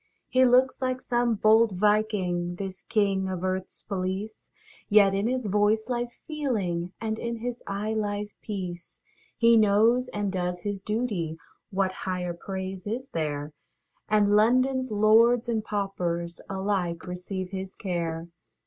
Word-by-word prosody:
He 255 0 +5
looks 255 +2 +4
like 255 0 0
some 240 -2 +1
bold 220 +1 +4
Viking, 185 -3 +1
This 190 0 -5
king 195 -3 +1
of 185 -2 -3
earthâs 185 0 -3
policeâ 195 +2 -4 0.4
Yet 205 -2 +6
in 200 +3 +1
his 255 -1 -1
voice 210 +3 +2
lies 240 -1 -2
feeling, 205 - -2
And 220 0 -3
in 235 0 -3
his 240 +1 -5
eye 205 +2 -2
lies 205 -1 -2
peace; 180 -5 -6 0.3
He 230 0 +6
knows 225 +4 +4
and 205 -3 -2
does 180 -1 -2
his 205 0 -3
dutyâ 205 -7 -2 0.3
(What 190 -2 0
higher 180 -2 -3
praise 190 +2 -6
is 250 +5 -4
there?) 150 - -3 0.6
And 210 -1 +4
Londonâs 255 +5 +3
lords 225 +3 +4
and 225 -2 0
paupers 175 -5 -2
Alike 190 -4 -1
receive 180 +1 -5
his 190 0 -5
care. 170 -3 -3
205 Hz, 140 wpm, -27 LUFS, 185-225 Hz, 0.6 s, Yet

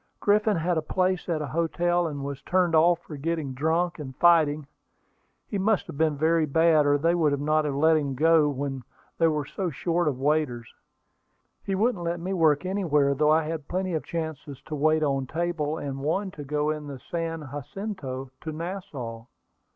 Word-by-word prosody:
Griffin 210 -1 +3
had 165 0 +1
a - - -3
place 185 +3 -1
at 155 -3 0
a 140 - -6
hotel, 175 +1 +1
and 145 -3 -5
was 140 -1 -5
turned 180 -2 +1
off 170 +2 +5
for 150 - -8
getting 155 -2 -2
drunk, 165 +5 0
and 130 -3 -7
fighting. 155 -3 +4 0.8
He 200 - -3
must 210 +1 +2
have - - -9
been 155 -1 +1
very 160 +1 +2
bad, 160 0 +4
or 145 0 +4
they 165 +4 +2
would 150 -5 +2
not 155 +1 +1
have 145 -2 -1
let 160 +3 +4
him 140 -3 -2
go 160 +1 +4
when 135 -1 -3 0.4
they 165 - +5
were 150 -2 0
so 185 +5 -3
short 170 +3 -1
of 140 -4 0
waiters. 135 -4 -1 0.9
He 195 - -2
wouldn't 210 -2 +1
let 170 0 -2
me 185 +3 -3
work 160 -3 +3
anywhere, 155 -8 +2
though 150 +2 +2
I 160 +1 +4
had 155 -2 -5
plenty 185 0 -2
of 160 - -1
chances 160 -4 -5
to 155 - -8
wait 155 +1 +2
on 135 -2 0
table, 160 -1 -2
and 135 -3 -5
one 185 +8 -1
to 150 - -8
go 150 +2 0
in 150 -1 -5
the 140 -2 -6
San 165 -3 -3
Jacinto 145 -4 -6
to 160 - -5
Nassau. 150 -9 -6
155 Hz, 190 wpm, -26 LUFS, 145-170 Hz, 0.9 s, off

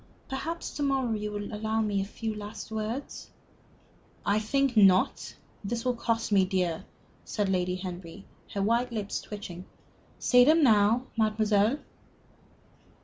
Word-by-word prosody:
Perhaps 325 +6 -4
to - - -6
morrow 270 -4 +1
you 210 -1 -3
will 205 0 -5
allow 220 +1 -1
me 205 -3 +1
a - - -2
few 220 +2 -4
last 210 +1 -8
words?" 220 +5 -4 1.0
"I 205 +1 +3
think 270 +4 +1
not. 195 -3 +4 0.3
This 230 +4 -3
will 250 - +2
cost 230 -1 -1
me 195 -2 +5
dear," 185 -3 -1 0.4
said 205 -2 -1
Lady 180 -1 0
Henry, 185 0 -7 0.3
her 200 - 0
white 235 +4 +1
lips 210 -3 -3
twitching. 185 -4 -8 0.5
"Say 250 -1 +5
them 310 +4 +5
now, 225 +1 +4
mademoiselle." 215 +1 +2
215 Hz, 140 wpm, -28 LUFS, 200-235 Hz, 1.0 s, me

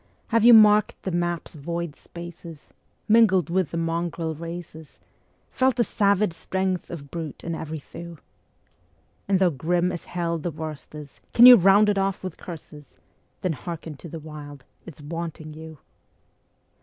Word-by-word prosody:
Have 230 -1 +2
you 240 0 +9
marked 210 -1 +5
the 190 - -3
map's 175 -1 -2
void 170 +1 -5
spaces, 170 -2 -11 0.5
mingled 205 -7 +4
with 185 -3 +1
the 170 - -4
mongrel 165 0 -2
races, 165 -1 -9 0.5
Felt 260 -1 +2
the 240 - +2
savage 200 -4 +1
strength 190 +1 -2
of 145 -5 -9
brute 160 -4 -6
in 170 - -3
every 160 -1 -5
thew? 170 +3 -10 1.1
And 195 -1 +3
though 185 -2 +3
grim 175 +5 0
as 175 - -7
hell 170 -1 -2
the 175 - -3
worst 155 -1 -8
is, 150 -2 -11 0.2
can 235 - +9
you 250 0 +12
round 200 +1 +5
it 205 -1 +2
off 195 0 -1
with 185 -3 -6
curses? 150 -4 -11 0.4
Then 180 - 0
hearken 160 +1 -7
to 170 - -10
the 165 - -7
Wild 145 -3 -10 0.2
it's 160 -2 -11
wanting 160 0 -6
you. 160 0 -10
170 Hz, 155 wpm, -24 LUFS, 160-190 Hz, 1.1 s, you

